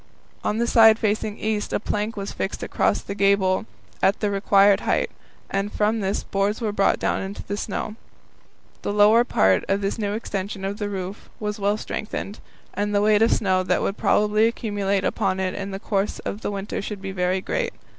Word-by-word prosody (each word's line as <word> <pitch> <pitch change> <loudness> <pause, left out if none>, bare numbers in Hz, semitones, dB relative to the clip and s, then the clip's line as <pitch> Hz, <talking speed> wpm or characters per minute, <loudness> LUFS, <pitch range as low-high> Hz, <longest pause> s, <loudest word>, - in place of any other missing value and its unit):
On 210 - 0
the 235 - +1
side 225 -2 +6
facing 215 -1 -1
east 215 -1 -2
a - - 0
plank 210 +1 -2
was 200 0 -4
fixed 195 - -4
across - - +1
the - - -5
gable 200 0 +2 0.3
at 195 - +3
the 205 -2 0
required 200 0 +4
height, - - 0 0.4
and 195 +1 -2
from 215 +2 +1
this 195 -1 -1
boards 200 +2 -1
were 220 -3 -1
brought 200 -1 +2
down 195 +1 -2
to - - -9
the 200 - -2
snow. 210 +1 -4 0.9
The 205 - -2
lower 210 +3 +6
part 95 - +3
of 195 +1 +1
this 200 +3 -2
new 205 -1 -1
extension 200 -2 -4
of 200 +2 -4
the 205 -1 -2
roof 190 0 -6
was 210 0 -3
well 205 +1 +1
strengthened, 210 -1 -5 0.3
as 205 +2 -1
the 205 - +2
weight 210 0 +4
of 225 - +4
snow 185 -3 +2
that 185 - 0
would 195 - -1
probably 210 +1 +3
accumulate 205 -4 -1
upon 185 - 0
it 185 -1 -1
in 200 -1 -5
the 195 - -4
course 200 -1 -1
of 205 - -5
the - - -2
winter 200 0 -4
would 210 -2 -6
be 195 0 -5
very 185 0 0
great. - - -2
205 Hz, 200 wpm, -23 LUFS, 195-210 Hz, 0.9 s, side